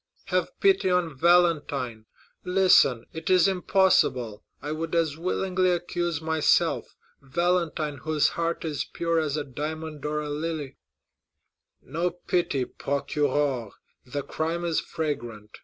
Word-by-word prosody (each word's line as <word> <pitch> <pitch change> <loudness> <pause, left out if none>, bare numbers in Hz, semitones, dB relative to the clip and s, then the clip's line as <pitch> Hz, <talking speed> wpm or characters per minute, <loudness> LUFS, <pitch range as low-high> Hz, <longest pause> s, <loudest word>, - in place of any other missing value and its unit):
"Have - - -1
pity 390 - +3
on 180 -4 +1
Valentine! 145 -8 +2 0.4
Listen, 180 -10 +4
it 160 0 -5
is 185 -1 +5
impossible. 180 - +2 0.2
I 145 - -5
would 160 +2 -3
as 160 -3 +1
willingly 185 +2 0
accuse 175 -2 -1
myself! 160 -1 +1 0.3
Valentine, 160 0 0
whose 155 +2 +1
heart 170 0 -2
is 150 -3 -2
pure 170 -1 0
as 155 -2 -1
a 150 - -1
diamond 155 +2 -6
or 150 0 -1
a 150 -1 -4
lily!" 150 -2 -4 1.1
"No 170 +6 -1
pity, 175 -6 -1
procureur; 140 -4 -1 0.3
the 140 +3 -4
crime 165 +2 -2
is 165 -2 +1
fragrant. 120 -10 -5
160 Hz, 125 wpm, -26 LUFS, 145-175 Hz, 1.1 s, is